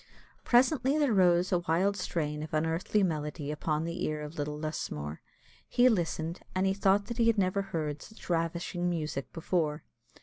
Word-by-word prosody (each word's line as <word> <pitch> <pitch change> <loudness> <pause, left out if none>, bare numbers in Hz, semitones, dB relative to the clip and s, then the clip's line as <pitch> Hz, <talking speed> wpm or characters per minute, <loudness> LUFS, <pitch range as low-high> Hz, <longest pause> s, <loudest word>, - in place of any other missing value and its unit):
Presently 265 +3 +3
there 290 -6 +3
rose 180 -2 +4
a 180 - +3
wild 175 +4 +1
strain 150 -5 -2
of 155 0 -4
unearthly 165 +6 +1
melody 150 -3 -2
upon 150 +1 -1
the 170 +2 -3
ear 150 0 -2
of 150 +2 -8
little 150 -1 -3
Lusmore; 75 - -4 0.5
he 250 +1 +5
listened, 170 -4 -1 0.2
and 185 +1 +2
he 190 - +3
thought 200 +1 +3
that 235 +2 -6
he 230 - +4
had 230 -1 +3
never 195 0 +2
heard 155 -6 -3
such 220 - -13
ravishing 170 +1 -1
music 155 -5 -3
before. 160 -2 -1
170 Hz, 170 wpm, -30 LUFS, 155-195 Hz, 0.5 s, he